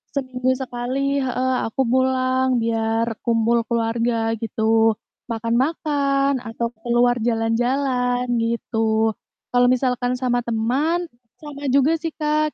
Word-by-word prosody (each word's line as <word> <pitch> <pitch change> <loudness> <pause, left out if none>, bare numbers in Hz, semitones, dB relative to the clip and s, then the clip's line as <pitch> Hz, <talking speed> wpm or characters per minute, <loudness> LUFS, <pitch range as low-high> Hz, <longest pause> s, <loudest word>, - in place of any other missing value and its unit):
seminggu 255 -2 -1
sekali 265 +2 -2
heeh, 260 0 0
aku 225 +4 -2
pulang 260 +1 +2 0.2
biar 225 0 0 0.2
kumpul 230 0 +2
keluarga 230 0 0
gitu, 225 0 +2 0.3
makan-makan, 275 +4 0
atau 235 0 -4
keluar 245 0 +2
jalan-jalan, 245 +2 0 0.2
gitu. 225 -1 0 0.4
Kalau 245 0 +4
misalkan 250 0 +1
sama 250 -1 0
teman, 270 +10 0 0.3
sama 290 -1 -8
juga 280 +4 +4
sih 325 0 -4
Kak, 305 0 0
245 Hz, 105 wpm, -22 LUFS, 230-270 Hz, 0.4 s, Kalau